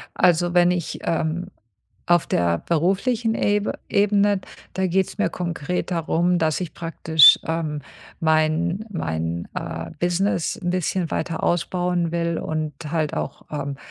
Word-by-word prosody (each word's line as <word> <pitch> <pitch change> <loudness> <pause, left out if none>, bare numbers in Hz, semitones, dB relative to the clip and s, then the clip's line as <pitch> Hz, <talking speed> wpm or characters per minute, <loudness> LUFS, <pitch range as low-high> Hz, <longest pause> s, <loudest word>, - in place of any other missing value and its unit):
Also, 175 0 +3
wenn 175 0 +5
ich, 180 -1 -2
ähm 165 +2 -1 0.6
auf 175 -1 +3
der 85 -1 +1
beruflichen 205 +8 0
Ebe 205 0 0
Ebene, 205 -1 +3 0.3
da 190 0 0
geht's 190 +3 0
mir 210 - +2
konkret 175 +1 -3
darum, 175 +1 +1
dass 160 +1 0
ich 175 - -5
praktisch, 160 -2 +6
ähm, 155 -2 -2 0.4
mein 160 +5 +1
mein, 80 - -3
äh, 80 0 -5
Business 175 +2 0
'n 175 - -1
bisschen 180 -1 -1
weiter 165 -2 -2
ausbauen 175 0 0
will 170 -1 -1
und 155 -2 -3 0.2
halt 155 -2 -1
auch, - - -4
ähm, 140 -1 -3
170 Hz, 135 wpm, -23 LUFS, 155-180 Hz, 0.6 s, praktisch